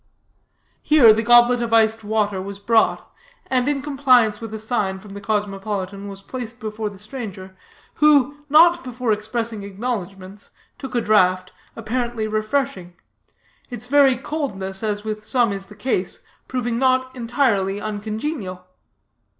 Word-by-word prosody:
Here 270 -8 +6
the 220 - 0
goblet 240 +1 +5
of 230 -1 -2
iced 225 0 +3
water 205 -2 -1
was 200 +1 -7
brought, 220 +2 +1 0.4
and, 255 -1 0
in 280 -2 -1
compliance 255 -7 +3
with 225 -2 -7
a 220 - -5
sign 210 -4 -1
from 195 +1 -12
the 200 - -8
cosmopolitan, 200 -1 -3
was 195 0 -9
placed 245 0 -7
before 215 -1 -4
the 200 - -13
stranger, 200 -4 -8 0.5
who, 290 -2 +4
not 340 +4 +6
before 250 -2 -2
expressing 220 +1 -2
acknowledgments, 200 -2 -6 0.3
took 265 -2 -7
a 240 - +2
draught, 185 -4 +2 0.2
apparently 235 0 -2
refreshing 215 -4 -2 0.7
its 245 -2 -7
very 270 -1 +4
coldness, 195 -10 -4
as 210 -2 -2
with 215 -1 -5
some 235 -2 +1
is 195 -1 -7
the 210 - -14
case, 205 -4 -2 0.2
proving 240 -2 -2
not 260 0 +1
entirely 230 -6 0
uncongenial. 215 - -5
220 Hz, 140 wpm, -21 LUFS, 200-250 Hz, 0.7 s, Here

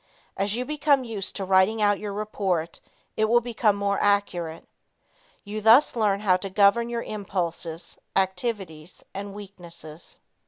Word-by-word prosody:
As 200 +2 0
you 250 +1 -2
become 290 -2 +2
used 215 -5 -4
to 195 - -3
writing 190 +4 +3
out 205 -1 +3
your 210 -1 -5
report, 195 -5 -2 0.3
it 220 - +2
will 235 +2 +4
be 240 -1 -7 0.2
more 200 0 -1
accurate. 180 -5 0 0.8
You 215 +1 -5
thus 230 +7 +6
learn 205 -3 +1
how 185 -3 +4
to 195 +1 -6
govern 200 +4 +4
your 235 -1 -3
impulses, 170 -5 -4 0.2
activities 190 -4 -2
and 200 0 -6
weaknesses. 170 -5 -10
200 Hz, 145 wpm, -25 LUFS, 185-215 Hz, 0.8 s, thus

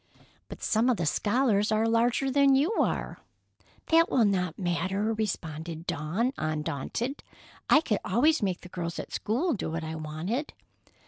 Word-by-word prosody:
"But - - -9
some 225 +4 +2
of 245 - +2
the 170 - -1
scholars 210 - +1
are 220 +1 +2
larger 240 +4 +2
than 275 0 +5
you 290 +9 +2
are." - - -1 0.7
"That 330 +1 +5
will 240 -4 +3
not 180 -4 0
matter," 190 +4 -1
responded 165 -6 -4
Dawn, 185 - -1
undaunted. 155 - -3 0.5
"I 305 - +7
could 215 -10 0
always 280 +11 +3
make 190 -3 -1
the 180 - -11
girls 170 -2 -4
at - - -7
school 285 - 0
do 200 - -3
what 165 0 -3
I 160 0 -4
wanted." 160 - -4
210 Hz, 155 wpm, -28 LUFS, 170-250 Hz, 0.7 s, I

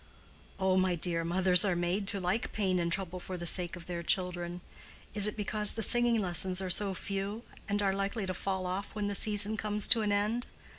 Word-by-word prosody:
"Oh, 190 -1 +2
my 185 -1 +1
dear, 170 0 -1
mothers 180 +2 +4
are 190 -4 +1
made 175 +3 -1
to 200 - +2
like 185 +5 -1
pain 190 -4 0
and 170 0 -1
trouble 185 0 -3
for 185 +1 -7
the 175 - -6
sake 175 0 +1
of 170 -2 -11
their 175 -1 -5
children. 175 0 -1 0.5
Is 205 0 +2
it 210 - -5
because 210 0 +4
the 225 - -2
singing 240 +1 +4
lessons 180 -1 0
are 190 -1 -3
so 195 +1 0
few, 200 +4 -5 0.3
and 205 0 0
are 195 -1 +1
likely 195 +2 -3
to 185 - -3
fall 190 0 -3
off 185 +4 -5
when 210 -1 -2
the - - -3
season 210 +1 +2
comes 210 -1 -1
to 230 - +6
an 210 -1 -1
end? 210 +4 -1
190 Hz, 215 wpm, -30 LUFS, 180-205 Hz, 0.5 s, to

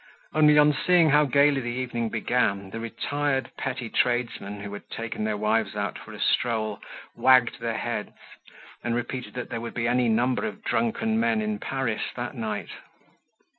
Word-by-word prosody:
Only, 150 -1 +5
on 150 0 +6
seeing 175 -4 +5
how 150 +1 +5
gaily 140 +1 +4
the 120 - -5
evening 120 -2 -2
began, 105 -4 0
the 115 - -5
retired 135 +4 -2
petty 130 -3 -3
tradesmen 120 -4 -1
who 100 0 -6
had 105 - -9
taken 115 -1 -4
their 110 -1 -1
wives 105 0 0
out 100 -1 -3
for 110 - -11
a 105 - -9
stroll 110 -2 0 0.3
wagged 130 -2 +4
their 115 -1 -2
heads, - - -3 0.7
and 120 -1 0
repeated 120 -2 -4
that 125 - -5
there 115 - -3
would 115 - -6
be 115 -1 0
any 120 0 +2
number 120 - +1
of 215 0 -8
drunken 225 -1 0
men 225 -1 +2
in 215 -1 -2
Paris 130 -5 -2
that 120 +1 -4
night. 110 -5 -4
120 Hz, 170 wpm, -26 LUFS, 110-140 Hz, 0.7 s, on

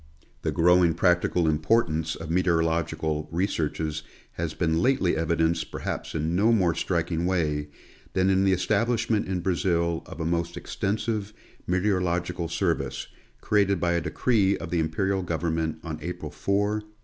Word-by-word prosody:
The - - -1
growing 90 -1 +4
practical 90 -1 +2
importance 80 0 +1
of 80 0 -6
meteorological 80 -3 0
researches 80 -3 -1 0.3
has 85 -2 -4
been 80 -1 +1
lately 130 -6 +2
evidenced 80 +1 0
perhaps - - -5
in 80 +2 -1
no 105 +5 +4
more 95 -7 +3
striking 85 0 -1
way 75 -5 0 0.5
than 95 +1 +3
in 95 0 +3
the 95 - +3
establishment 110 +4 +1
in 95 -2 -2
Brazil 85 -2 0
of - - -9
a 80 - -2
most 85 0 -1
extensive 105 0 -2 0.3
meteorological 90 -2 0
service, - - -1 0.3
created 100 -3 +2
by 85 0 +1
a 85 0 +1
decree 100 +1 +1
of 85 - -7
the 85 - +1
Imperial 95 +4 0
government 80 -2 -1
on 80 -2 -5
April 90 -4 -5
4, 100 +7 0
1888. 105 +1 -3
85 Hz, 145 wpm, -26 LUFS, 80-95 Hz, 0.5 s, growing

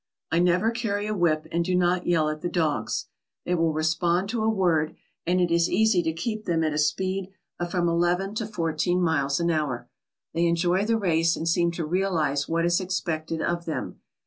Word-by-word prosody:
I 165 - +2
never 180 +6 +3
carry 215 -3 -2
a 215 - -2
whip 165 -5 +1
and 170 +1 +1
do 180 +1 0
not 180 0 +1
yell 165 -3 +3
at 155 0 -3
the 175 - -2
dogs. 160 -5 -1 0.4
They 180 - 0
will 165 -2 +2
respond 170 +4 0
to 230 0 -1
a 220 - +2
word, 175 -7 +1 0.3
and 180 +1 +2
it 175 -1 +1
is 170 0 +3
easy 220 -4 +3
to 160 -1 -1
keep 215 +6 -4
them 165 -2 +1
at 155 -1 0
a 150 - -1
speed 185 +5 0 0.3
of 175 0 -2
from 175 -1 0
eleven 175 +4 +1
to 220 0 -3
fourteen 175 -2 0
miles 140 -5 +1
an 170 0 +1
hour. 150 -6 -2 0.4
They 170 +1 +2
enjoy 175 +3 +1
the 225 +1 +2
race 165 -5 +2
and 165 - -4
seem 170 +1 +2
to 165 -1 -3
realize 155 -5 0
what 165 +1 +1
is 175 +2 +2
expected 165 -3 -2
of 170 0 -1
them. 160 - -4
175 Hz, 205 wpm, -25 LUFS, 160-185 Hz, 0.4 s, never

